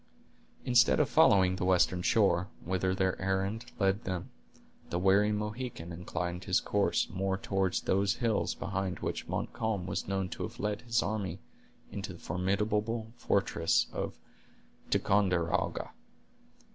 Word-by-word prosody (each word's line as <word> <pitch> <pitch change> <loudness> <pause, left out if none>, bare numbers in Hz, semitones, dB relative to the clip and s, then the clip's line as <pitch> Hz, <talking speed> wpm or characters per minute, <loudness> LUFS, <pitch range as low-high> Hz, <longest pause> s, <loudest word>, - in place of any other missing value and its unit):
Instead 120 -1 +5
of - - +3
following 95 -2 +5
the - - -2
western 90 -1 +3
shore, 95 -4 +3 0.2
whither 95 +1 0
their 95 -1 0
errand 95 +4 -1
led 95 +2 +1
them, 90 -2 -4 0.6
the 85 - -1
wary 100 +3 +4
Mohican 105 -4 -4
inclined 90 +1 -4
his 95 - +3
course 100 -1 +1
more 95 0 -1
toward 95 -1 0
those 100 +2 +2
hills 115 -4 0
behind 95 -2 -3
which - - -3
Montcalm 110 -5 -2
was 90 - -3
known 95 -1 -1
to - - -7
have - - -5
led 105 0 -1
his 120 -1 +1
army 100 -4 -3 0.5
into - - -5
the - - -12
formidable 105 +4 -1
fortress 100 -7 +1
of - - -4 0.7
Ticonderoga. 90 -3 +1
95 Hz, 135 wpm, -31 LUFS, 90-105 Hz, 0.7 s, Instead